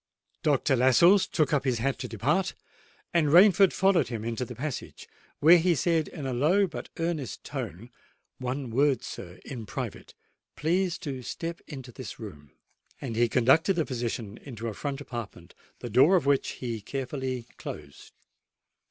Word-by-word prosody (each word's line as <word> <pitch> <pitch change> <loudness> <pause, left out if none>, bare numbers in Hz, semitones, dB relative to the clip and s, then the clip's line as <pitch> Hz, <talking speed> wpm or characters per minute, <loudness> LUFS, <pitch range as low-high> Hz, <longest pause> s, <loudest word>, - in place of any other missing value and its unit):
Dr. 145 -1 +2
Lascelles 130 - +5
took 155 -3 0
up 140 -2 +2
his 130 -3 +1
hat 135 +4 -1
to 125 - -4
depart, 135 - 0 0.6
and 170 -3 +3
Rainford 190 +4 +7
followed 190 -6 +3
him 115 -3 -5
into 115 +2 -2
the 125 0 -7
passage, 135 +2 -6 0.3
where 170 +4 +7
he 175 +1 +3
said 165 -1 +1
in 150 -5 -7
a 130 - -2
low 165 +11 +3
but 180 - -7
earnest 165 -6 -3
tone, 115 +9 -6 0.5
"One 130 0 -3
word, 135 +2 +2
sir, 90 +1 -8
in 115 -6 -7
private! - - -6 0.4
Please 175 +3 0
to 135 -3 -4
step 165 +7 -5
into 130 -5 -8
this - - -8
room." 75 -1 -10 0.5
And 120 -5 -5
he 120 +1 +3
conducted 135 - +4
the 165 -3 +1
physician 115 -4 -4
into 115 -4 -7
a - - -5
front 140 +5 -4
apartment, 115 -10 -8 0.3
the 120 - -5
door 135 - +6
of 170 -7 +2
which 140 -1 +2
he 115 -4 -5
carefully 130 0 -4
closed. 70 -1 -9
135 Hz, 160 wpm, -28 LUFS, 120-160 Hz, 0.6 s, Rainford